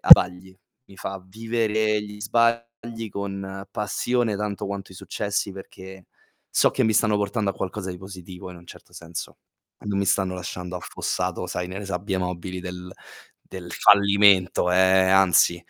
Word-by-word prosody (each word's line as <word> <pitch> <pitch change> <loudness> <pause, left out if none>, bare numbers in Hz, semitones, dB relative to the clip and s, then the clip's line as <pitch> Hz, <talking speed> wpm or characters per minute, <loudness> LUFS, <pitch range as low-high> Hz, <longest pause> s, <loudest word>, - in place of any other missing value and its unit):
a - - -7
vagli, 95 +1 +5 0.3
mi 95 - -16
fa 95 -1 -6
vivere 110 0 0
gli 105 0 -10
sbagli 115 +1 -1
con 95 -1 -5
passione 110 +1 -1
tanto 105 -1 -3
quanto 100 -1 -6
i - - -13
successi, 100 +1 -2
perché 95 -1 -11 0.4
so - - +4
che - - 0
mi 110 - +3
stanno 105 -1 +3
portando 105 0 -1
a - - -6
qualcosa 95 0 -4
di 90 - -7
positivo 95 -1 -10
in 90 - -11
un 85 - -17
certo - - -14
senso, 85 0 -8 0.4
e - - -13
non 100 -1 -1
mi 100 - 0
stanno 95 -1 +1
lasciando 90 0 -6
affossato, - - -3
sai, 90 0 -4
nelle 95 +2 -6
sabbie 95 +1 -2
mobili 90 0 -4
del 90 0 -8 0.6
del 90 -2 -8
fallimento, 100 -3 +5
ehm, 95 0 +4
anzi, 95 -2 +5
95 Hz, 160 wpm, -24 LUFS, 90-105 Hz, 0.6 s, vagli